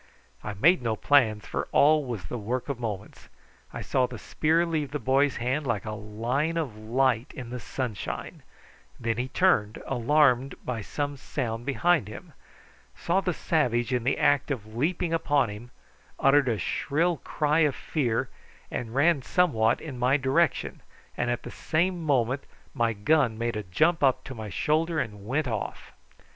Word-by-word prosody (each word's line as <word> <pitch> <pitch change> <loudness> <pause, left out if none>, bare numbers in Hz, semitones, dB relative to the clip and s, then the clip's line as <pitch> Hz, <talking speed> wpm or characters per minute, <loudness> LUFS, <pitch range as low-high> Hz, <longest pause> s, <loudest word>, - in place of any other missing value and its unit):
I 105 -1 -5
made 165 - +4
no 115 -2 -1
plans, 110 -6 +3
for - - -3
all 150 +1 +5
was 115 -7 -5
the 120 +6 -5
work 120 +6 -3
of 135 -4 -3
moments. 105 -4 -6 0.4
I - - -6
saw 130 -2 +1
the 120 -1 -8
spear 160 +9 +1
leave 155 -4 -2
the 150 - -3
boy's 135 +2 +2
hand 130 +4 -1
like 110 -4 -1
a 110 - -3
line 115 +10 -2
of 145 -10 -2
light 120 +2 0
in 125 -5 -7
the 125 - -4
sunshine; 120 -2 -5 0.6
then 115 -2 -1
he 125 - -1
turned, 125 - +2
alarmed 135 +1 +2
by 120 -3 -3
some 145 +6 -3
sound 120 -3 -4
behind 160 - +2
him, 110 - -10 0.6
saw 180 +3 0
the 185 - 0
savage 130 -7 0
in 125 -2 0
the 130 - +1
act 145 0 +2
of 110 -6 -5
leaping 165 +6 0
upon 145 -6 +2
him, 110 +4 -9 0.5
uttered 135 -1 +4
a 115 - 0
shrill 160 - 0
cry 150 +2 0
of 150 -4 +3
fear, 125 -8 -1 0.4
and 115 0 -4
ran 150 +1 +4
somewhat 120 -9 +2
in 135 -6 -7
my 130 +3 +3
direction, 130 -1 0 0.3
and 120 - -1
at 120 - -2
the - - -7
same 175 +2 0
moment 130 -3 +1 0.3
my 120 -4 +1
gun 115 +2 +2
made 120 0 -2
a 105 - -2
jump 155 - +1
up 135 -3 +2
at - - -6
my 110 -2 -6
shoulder 160 - 0
and 105 -5 -5
went 135 +4 0
off. 110 -4 -4
130 Hz, 170 wpm, -27 LUFS, 115-150 Hz, 0.6 s, all